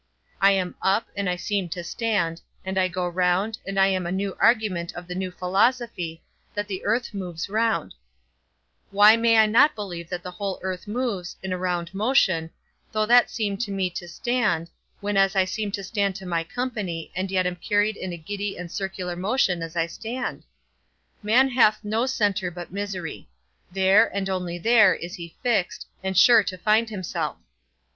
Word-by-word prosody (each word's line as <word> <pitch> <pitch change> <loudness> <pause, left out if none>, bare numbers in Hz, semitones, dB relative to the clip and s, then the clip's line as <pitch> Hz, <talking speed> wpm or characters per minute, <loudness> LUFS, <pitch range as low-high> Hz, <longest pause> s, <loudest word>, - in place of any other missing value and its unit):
I 195 0 +6
am 185 -2 -1
up, 195 +4 +2
and 200 -2 -1
I 180 - 0
seem 195 0 -2
to 175 +1 -5
stand, 175 -5 -1 0.2
and 190 0 -3
I 185 - +3
go 180 0 -2
round, 180 +5 0
and 195 0 -1
I 195 - +6
am 185 -2 0
a - - -3
new 195 +1 -2
argument 210 -7 +2
of 175 0 -8
the 180 - -5
new 185 +1 -3
philosophy, 185 -2 0 0.3
that 205 0 -2
the 190 -2 -5
earth 235 +2 0
moves 180 -3 -5
round; 225 +2 0 1.0
why 210 +2 +7
may 230 0 +3
I 220 - +7
not 255 +8 +5
believe 175 -6 -6
that 180 -1 -4
the 180 - -6
whole 195 +1 -4
earth 185 +1 -4
moves, 210 -6 -3
in 190 -1 -2
a - - -2
round 175 -1 -2
motion, 195 -7 +2 0.4
though 215 0 +1
that 240 +2 +5
seem 205 -4 -2
to 220 0 -3
me 190 -2 -1
to 175 0 -6
stand, 190 -4 -1 0.3
when 205 0 -1
as 195 +1 +3
I 190 -1 +4
seem 205 +2 -3
to 200 - -3
stand 200 -1 -1
to 190 0 -8
my 170 -2 -1
company, 205 -6 -4
and 190 +1 -2
yet 185 -1 +1
am 180 0 -1
carried 205 +4 +1
in 185 - -5
a 175 - -5
giddy 200 +4 -4
and 175 -1 -7
circular 190 -2 -4
motion 185 -1 +1
as 165 +1 -6
I 165 -1 +2
stand? 230 +9 -5 0.8
Man 235 +6 +4
hath 230 -4 +3
no 220 +4 0
centre 205 -7 0
but 175 -1 -9
misery; 195 -5 -5 0.4
there, 195 +4 +5
and 195 -1 -3
only 180 -2 -3
there, 215 0 +5
he - - -6
is 170 -2 -8
fixed, 225 -7 0 0.2
and 190 -1 -2
sure 230 +4 +8
to 185 0 -4
find 215 +4 +2
himself. 190 -5 -3
195 Hz, 190 wpm, -24 LUFS, 180-215 Hz, 1.0 s, sure